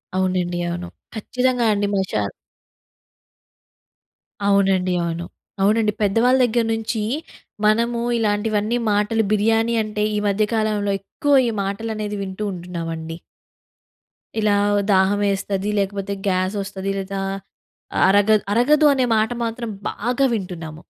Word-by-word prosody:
అవునండి. 185 -2 0
అవును. 175 +1 -4 0.3
ఖచ్చితంగా 250 +2 0
అండి 205 0 0
మషాల 105 - -1 2.2
అవునండి. 190 -2 +3
అవును. 170 0 -3 0.4
అవునండి. 215 +1 +3
పెద్దవాళ్ళ 230 +6 +3
దగ్గర 235 0 +1
నుంచి 225 0 -2 0.6
మనము 235 +2 +2 0.2
ఇలాంటివన్నీ 215 +1 0
మాటలు 210 +2 +1
బిర్యానీ 225 +2 +2
అంటే 210 0 -2
ఈ - - 0
మధ్య 205 +1 +2
కాలంలో 210 -2 0
ఎక్కువ 285 +8 0
ఈ - - -1
మాటలు 200 +3 -3
అనేది 210 -1 -3
వింటూ 190 +2 -5
ఉంటున్నామండి. 165 -2 -5 1.2
ఇలా 210 -1 +3 0.4
దాహం 190 +2 +3
వేస్తది. 195 0 -1
లేకపోతే, 200 0 -2
గ్యాసొస్తది, 195 +1 -1
లేదా 195 0 -4 0.9
అరగ 205 +2 +4 0.2
అరగదు 295 +7 +4
అనే 260 -2 +2
మాట 220 +2 +2
మాత్రం 230 0 -4 0.2
బాగా 245 +5 -1
వింటున్నాము. 170 -6 -5
205 Hz, 110 wpm, -21 LUFS, 190-225 Hz, 2.2 s, అరగ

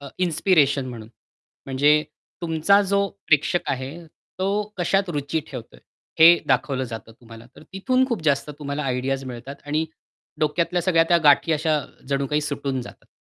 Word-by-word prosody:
अ, 140 - -9
inspiration 155 -6 +2
म्हणून, 115 -3 -9 0.6
म्हणजे 145 +3 +3 0.4
तुमचा 165 +4 +3
जो 200 0 +1 0.2
प्रेक्षक 155 +3 +3
आहे, 130 0 -3
तो 185 +4 -6 0.3
कशात 195 +2 +1
रुची 150 +1 -2
ठेवतोय? 125 -4 -9 0.4
हे 170 +2 +8
दाखवलं 130 0 0
जातं 115 -2 -8
तुम्हाला. 115 0 -14
तर - - -13
तिथून 255 +7 +1
खूप 230 -9 -2
जास्त 145 0 +1
तुम्हाला 145 0 -4
आयडियाज 135 +1 -2
मिळतात 130 +2 -8
आणि 155 +2 0 0.6
डोक्यातल्या 170 +3 0
सगळ्या 165 -2 +3
त्या 175 - +5
गाठी 145 +3 +5
अशा 155 0 +1 0.3
जणू 140 0 0
काही 150 +2 0
सुटून 140 -3 -3
जातात. - - -14
150 Hz, 150 wpm, -23 LUFS, 135-170 Hz, 0.6 s, हे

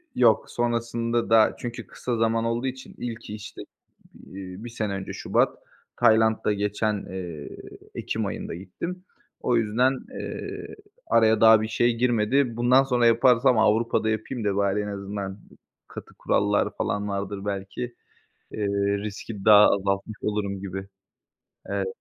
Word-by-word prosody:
Yok, 115 -3 +4
sonrasında 115 -1 -1
da, 110 -1 +5
çünkü 120 -1 -6
kısa 120 -2 -4
zaman 115 0 +1
olduğu 120 +3 -1
için 130 0 -7
ilki, 115 -3 -6
işte, 105 - -9 0.6
iii, 95 +2 -9
1 120 - -6
sene 105 -3 -3
önce 95 -1 -5
şubat - - +1 0.4
Tayland'da 110 -2 +3
geçen, 105 +1 -1
eee, 85 -6 -6 0.5
ekim - - -2
ayında - - -5
gittim. 170 - -7 0.4
O 120 - +1
yüzden, 125 +4 +2 0.2
eee, - - -6 0.3
araya 110 -1 +4
daha 110 -1 +8
bir 110 - -2
şey 120 +1 +2
girmedi. 120 +1 +1
Bundan 125 +3 +5
sonra 125 -3 +1
yaparsam, 120 +1 +4
Avrupa'da 110 +1 +2
yapayım 110 +2 -3
da, 100 -1 +1
bari 100 0 +1
en 105 - -4
azından 100 -1 -5 0.5
katı - - -10
kurallar 105 0 +1
falan 105 0 -1
vardır 100 0 -4
belki, 100 +3 -4 0.7
eee, 105 -1 -2 0.3
riski 105 0 -6
daha 105 -1 +8
azaltmış 100 +2 0
olurum 100 -2 -2
gibi. 95 0 -6 0.8
Evet, 100 -1 -2
110 Hz, 135 wpm, -25 LUFS, 100-120 Hz, 0.8 s, daha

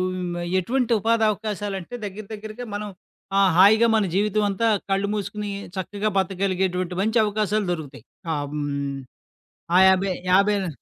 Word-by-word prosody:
హ్మ్, 180 -1 -4
ఆహ్, - - -4
ఎటువంటి 245 +6 -1
ఉపాధవకాశాలంటే 215 -2 -1
దగ్గర 205 +1 -7
దగ్గరగా 215 +3 -7
మనం 210 +1 -4 0.5
ఆహ్, 195 -2 +5
హాయిగా 215 +5 +7
మన 215 -2 +2
జీవితమంతా 210 +1 +1 0.2
కళ్ళు 195 +1 +1
మూసుకొని 205 0 -4 0.3
చక్కగా 205 +3 -2
బతకగలిగేటువంటి 185 -1 -1
మంచి 220 +3 +2
అవకాశాలు 210 -1 0
దొరుకుతాయి. 145 -8 -6 0.3
ఆహ్, 145 -1 -3
హ్మ్ 140 -2 -3 0.8
ఆయాబై 190 0 +4 0.2
యాభయా 200 0 +3
200 Hz, 120 wpm, -23 LUFS, 185-215 Hz, 0.8 s, హాయిగా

